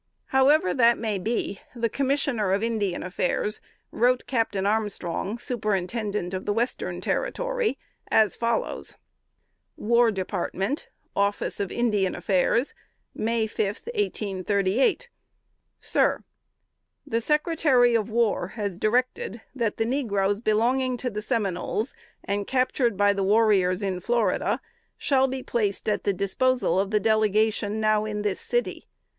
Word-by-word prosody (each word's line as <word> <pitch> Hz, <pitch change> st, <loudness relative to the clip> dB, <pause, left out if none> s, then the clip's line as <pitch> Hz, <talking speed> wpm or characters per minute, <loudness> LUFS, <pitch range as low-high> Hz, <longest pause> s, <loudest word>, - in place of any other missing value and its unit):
However 265 Hz, -6 st, +4 dB
that 235 Hz, -2 st, +4 dB
may 215 Hz, -3 st, -2 dB
be, 205 Hz, -1 st, -2 dB, 0.2 s
the 235 Hz, -1 st, 0 dB
Commissioner 260 Hz, -6 st, 0 dB
of 200 Hz, +3 st, 0 dB
Indian 215 Hz, -5 st, -1 dB
Affairs 200 Hz, +3 st, -1 dB, 0.3 s
wrote 250 Hz, +2 st, +2 dB
Captain 220 Hz, -6 st, 0 dB
Armstrong, 205 Hz, -1 st, -1 dB
Superintendent 210 Hz, -4 st, -2 dB
of 185 Hz, 0 st, -4 dB
the 205 Hz, -, +1 dB
Western 235 Hz, +4 st, -2 dB
Territory, -, -, -1 dB, 0.3 s
as 215 Hz, -2 st, +3 dB
follows: 230 Hz, -1 st, -2 dB, 0.8 s
"WAR 235 Hz, +1 st, +3 dB
DEPARTMENT, 195 Hz, -, -3 dB, 0.3 s
"Office 200 Hz, 0 st, 0 dB
of 200 Hz, -2 st, -2 dB
Indian 210 Hz, -6 st, +1 dB
Affairs, 200 Hz, +7 st, +1 dB, 0.4 s
May 225 Hz, 0 st, 0 dB
5, 215 Hz, -1 st, -1 dB, 0.3 s
1838. 205 Hz, -, 0 dB, 0.7 s
"SIR: -, -, +1 dB, 0.8 s
The 230 Hz, +1 st, -1 dB
Secretary 300 Hz, -3 st, +3 dB
of 225 Hz, -1 st, +1 dB
War 225 Hz, -5 st, +1 dB
has 200 Hz, -4 st, -3 dB
directed 235 Hz, -1 st, 0 dB
that 235 Hz, -5 st, -1 dB
the 225 Hz, -, +1 dB
negroes 205 Hz, -6 st, 0 dB
belonging 245 Hz, +4 st, +1 dB
to 250 Hz, 0 st, -3 dB
the 210 Hz, 0 st, -4 dB
Seminoles, 210 Hz, +3 st, -1 dB, 0.3 s
and 200 Hz, 0 st, -2 dB
captured 255 Hz, -4 st, +1 dB
by 205 Hz, 0 st, +4 dB
the 195 Hz, -1 st, -1 dB
warriors 200 Hz, -2 st, +3 dB
in 190 Hz, -2 st, -1 dB
Florida, 235 Hz, +5 st, 0 dB, 0.4 s
shall 265 Hz, -2 st, +2 dB
be 260 Hz, 0 st, -4 dB
placed 210 Hz, -4 st, -1 dB
at 210 Hz, -, 0 dB
the 200 Hz, -, +3 dB
disposal 200 Hz, +4 st, +1 dB
of 195 Hz, 0 st, 0 dB
the 210 Hz, 0 st, +2 dB
Delegation 215 Hz, 0 st, +1 dB
now 215 Hz, 0 st, +2 dB
in 210 Hz, -1 st, -3 dB
this 205 Hz, -2 st, -1 dB
city. 485 Hz, 0 st, -2 dB
220 Hz, 125 wpm, -25 LUFS, 200-245 Hz, 0.8 s, However